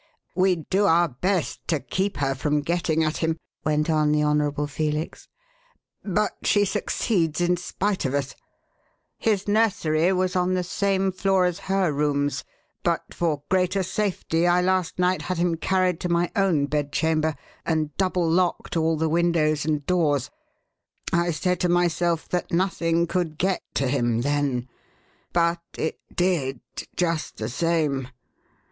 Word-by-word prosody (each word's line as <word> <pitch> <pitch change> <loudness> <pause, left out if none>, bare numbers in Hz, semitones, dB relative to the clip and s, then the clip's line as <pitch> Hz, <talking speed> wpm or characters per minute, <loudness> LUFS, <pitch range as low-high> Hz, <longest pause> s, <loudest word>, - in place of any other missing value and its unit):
"We 185 0 +3
do 190 +5 0
our 170 +1 +4
best 180 +6 -2
to 160 -3 +1
keep 190 +9 -2
her 135 -1 0
from 145 +3 0
getting 160 0 0
at 155 0 -1
him," 160 0 0 0.3
went 150 0 +1
on 155 -2 +2
the 150 0 +2
Honourable 150 -1 +1
Felix, 150 +2 -3 0.8
"but 210 +1 0
she 205 -1 +3
succeeds 185 -5 0
in 175 0 +3
spite 190 +3 -2
of 135 +1 0
us. 140 -1 -2 0.9
His 210 -3 0
nursery 190 -6 +2
was 185 0 0
on 180 0 +2
the 180 - 0
same 195 +1 0
floor 190 0 +2
as 180 +1 -1
her 190 -4 +2
rooms, 145 0 0 0.4
but - - -1
for 155 -4 -1
greater 185 +1 +1
safety 180 -3 0
I 175 0 +4
last 185 -1 0
night 180 +1 +2
had 185 -1 -3
him 175 0 +1
carried 185 0 +1
to 180 - -3
my 170 0 +1
own 185 -8 +2
bedchamber 155 +2 0 0.3
and 155 -3 -1
double 185 -3 +1
locked 175 +2 0
all 160 -1 +2
the 160 +1 +1
windows 155 -3 +2
and 150 -2 0
doors. 150 -7 +1 0.8
I 170 0 +2
said 180 +2 0
to 180 - +1
myself 175 -1 +1
that 180 - -1
nothing 170 -2 +1
could 170 -3 -2
get 190 +2 0
to 135 - +1
him 120 -3 +1
then; 140 -2 0 0.6
but 170 0 +2 0.2
it 160 - -2 0.2
did, 160 -8 0 0.4
just 165 -3 -1
the 110 0 -3
same! 150 -2 0
170 Hz, 150 wpm, -24 LUFS, 150-185 Hz, 0.9 s, our